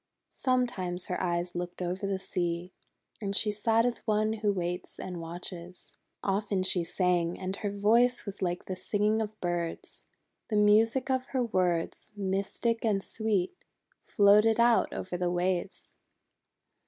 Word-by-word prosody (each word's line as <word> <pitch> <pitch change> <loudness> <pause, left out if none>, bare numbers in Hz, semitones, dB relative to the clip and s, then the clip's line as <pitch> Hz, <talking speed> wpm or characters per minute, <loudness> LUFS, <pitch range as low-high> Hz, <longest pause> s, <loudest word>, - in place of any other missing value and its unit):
Sometimes 220 -9 0
her 180 - -1
eyes 175 -1 -1
looked 175 0 -5
over 185 +2 -2
the 195 -1 0
sea, 180 -1 -3 0.5
and 200 -1 -2
she 210 - +3
sat 225 +2 +2
as 245 -1 0
one 215 0 +2
who 210 -2 0
waits 180 -2 -4
and 180 -2 -5
watches. 175 +1 -9 0.2
Often 200 -1 0
she 185 -2 +2
sang, 175 -1 +1
and 190 +1 -3
her 210 - -2
voice 230 +5 +3
was 200 -1 -6
like 175 -1 -1
the 185 - -4
singing 210 +3 +1
of 215 0 -5
birds. 175 -1 -4 0.4
The 215 - 0
music 225 +5 +4
of 260 -1 0
her 250 - +2
words, 180 -7 -1
mystic 200 +4 -1
and 205 -4 +1
sweet, 215 -5 -1 0.5
floated 210 +2 +4
out 235 0 +4
over 185 -1 -4
the 175 0 0
waves. 180 +2 -2
195 Hz, 145 wpm, -29 LUFS, 180-215 Hz, 0.5 s, music